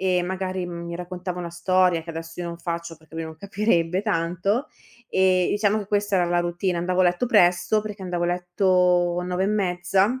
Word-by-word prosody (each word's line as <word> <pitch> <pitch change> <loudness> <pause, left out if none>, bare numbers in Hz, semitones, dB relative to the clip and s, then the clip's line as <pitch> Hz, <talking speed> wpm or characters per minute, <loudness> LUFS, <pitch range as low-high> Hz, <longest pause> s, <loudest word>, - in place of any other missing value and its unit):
e 185 -1 +2
magari 185 0 -3
mi 170 0 -6
raccontava 180 0 -5
una 175 -1 -4
storia, 180 0 +2
che 165 - -8
adesso 165 +1 -7
io 175 - -3
non 170 0 -6
faccio 170 -1 -4
perché 160 0 -19
lui 165 - -3
non 160 0 -9
capirebbe 190 -1 0
tanto, 195 - 0 0.4
e 185 -1 +3
diciamo 210 +1 +2
che 205 - -5
questa 205 0 +1
era 180 - +3
la 175 0 +1
routine. 175 +1 -1
Andavo 180 +2 0
a 185 - +5
letto 175 +8 +2
presto, 180 -1 +4
perché 210 -2 -7
andavo 175 -2 -2
a - - +1
letto 180 -1 +2
9 180 +1 -1
e - - +1
mezza 195 +3 +1
180 Hz, 200 wpm, -24 LUFS, 175-190 Hz, 0.4 s, a